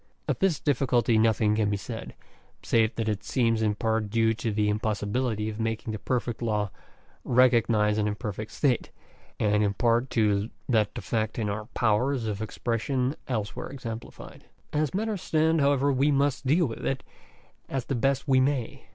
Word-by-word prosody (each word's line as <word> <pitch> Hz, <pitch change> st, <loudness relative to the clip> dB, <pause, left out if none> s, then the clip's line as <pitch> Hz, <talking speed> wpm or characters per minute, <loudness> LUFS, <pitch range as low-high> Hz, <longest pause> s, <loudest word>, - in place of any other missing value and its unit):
Of -, -, -1 dB
this 190 Hz, -6 st, +2 dB
difficulty 120 Hz, -5 st, +2 dB
nothing 110 Hz, -1 st, +3 dB
can 105 Hz, -1 st, +1 dB
be 100 Hz, -, 0 dB
said, 110 Hz, +3 st, -7 dB, 0.5 s
save 115 Hz, -1 st, +2 dB
that 115 Hz, -1 st, -2 dB
it 105 Hz, -1 st, -1 dB
seems 115 Hz, -3 st, +1 dB
in 105 Hz, -1 st, +1 dB
part 110 Hz, 0 st, 0 dB
due 115 Hz, +1 st, +2 dB
to 115 Hz, 0 st, -3 dB
the 105 Hz, 0 st, +1 dB
impossibility 105 Hz, +2 st, -1 dB
of 110 Hz, 0 st, -5 dB
making 115 Hz, 0 st, -2 dB
the 110 Hz, -, -4 dB
perfect 120 Hz, -1 st, -2 dB
law 105 Hz, -3 st, 0 dB, 0.5 s
recog 125 Hz, -2 st, +4 dB
nise 105 Hz, -2 st, +2 dB
an 105 Hz, -, +1 dB
imperfect 105 Hz, 0 st, -4 dB
state, 130 Hz, -5 st, 0 dB, 0.5 s
and 105 Hz, 0 st, +2 dB
in 100 Hz, -1 st, 0 dB
part 120 Hz, +2 st, +2 dB
to 105 Hz, -1 st, +2 dB, 0.2 s
that 110 Hz, -4 st, +1 dB
defect 110 Hz, -1 st, -2 dB
in 110 Hz, -3 st, -1 dB
our 105 Hz, +1 st, -4 dB
powers 120 Hz, +3 st, +1 dB
of 105 Hz, -1 st, -3 dB
expression 125 Hz, +5 st, -1 dB
elsewhere 110 Hz, -6 st, -3 dB
exemplified 120 Hz, -4 st, -8 dB, 0.3 s
(p. 150 Hz, -, 0 dB
89). -, -, +3 dB
As 155 Hz, -, -1 dB
matters 210 Hz, -2 st, -1 dB
stand, 160 Hz, 0 st, +2 dB
however, 140 Hz, 0 st, +3 dB
we 135 Hz, +2 st, +2 dB
must 140 Hz, -1 st, +1 dB
deal 165 Hz, +6 st, +4 dB
with 115 Hz, -, -6 dB
it 135 Hz, -1 st, -1 dB, 0.7 s
as 135 Hz, -2 st, -2 dB
best 135 Hz, +2 st, 0 dB
we 130 Hz, -1 st, +4 dB
may. 130 Hz, -3 st, -1 dB
115 Hz, 175 wpm, -27 LUFS, 105-130 Hz, 0.7 s, recog